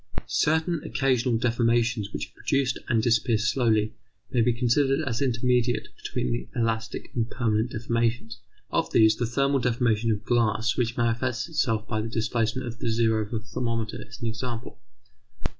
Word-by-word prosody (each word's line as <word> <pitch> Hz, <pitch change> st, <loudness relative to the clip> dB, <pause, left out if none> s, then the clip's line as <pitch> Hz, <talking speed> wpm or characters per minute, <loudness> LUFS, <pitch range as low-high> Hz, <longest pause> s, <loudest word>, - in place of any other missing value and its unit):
Certain 160 Hz, +1 st, +1 dB
occasional 125 Hz, -3 st, +1 dB
deformations 115 Hz, -2 st, +1 dB
which -, -, -4 dB
are -, -, -32 dB
produced 135 Hz, -2 st, 0 dB
and 115 Hz, -3 st, +2 dB
disappear 115 Hz, 0 st, +3 dB
slowly 110 Hz, -1 st, +1 dB, 0.4 s
may 125 Hz, -4 st, +2 dB
be 120 Hz, +2 st, +3 dB
considered 135 Hz, +4 st, +2 dB
as 115 Hz, 0 st, -1 dB
intermediate 125 Hz, -3 st, +1 dB
between 120 Hz, -1 st, -3 dB
elastic 115 Hz, -1 st, -2 dB
and 115 Hz, -1 st, -1 dB
permanent 110 Hz, -1 st, 0 dB
deformations. 115 Hz, 0 st, -1 dB, 0.3 s
Of -, -, 0 dB
these, 110 Hz, -1 st, +5 dB
the 120 Hz, -, 0 dB
thermal 140 Hz, +3 st, +1 dB
deformation 115 Hz, -2 st, +1 dB
of 105 Hz, 0 st, -2 dB
glass 115 Hz, -1 st, +2 dB
which 120 Hz, -1 st, -1 dB
manifests 120 Hz, +2 st, 0 dB
itself 115 Hz, -8 st, 0 dB
by 110 Hz, -2 st, -1 dB
the 115 Hz, -, -4 dB
displacement 115 Hz, +3 st, -1 dB
of 120 Hz, 0 st, -7 dB
the -, -, -1 dB
zero 110 Hz, -1 st, +2 dB
of -, -, -19 dB
a 115 Hz, -, -1 dB
thermometer 115 Hz, -1 st, -3 dB
is 125 Hz, +1 st, -11 dB
an 115 Hz, -, -1 dB
example. 120 Hz, +1 st, -5 dB
115 Hz, 160 wpm, -26 LUFS, 115-125 Hz, 0.4 s, these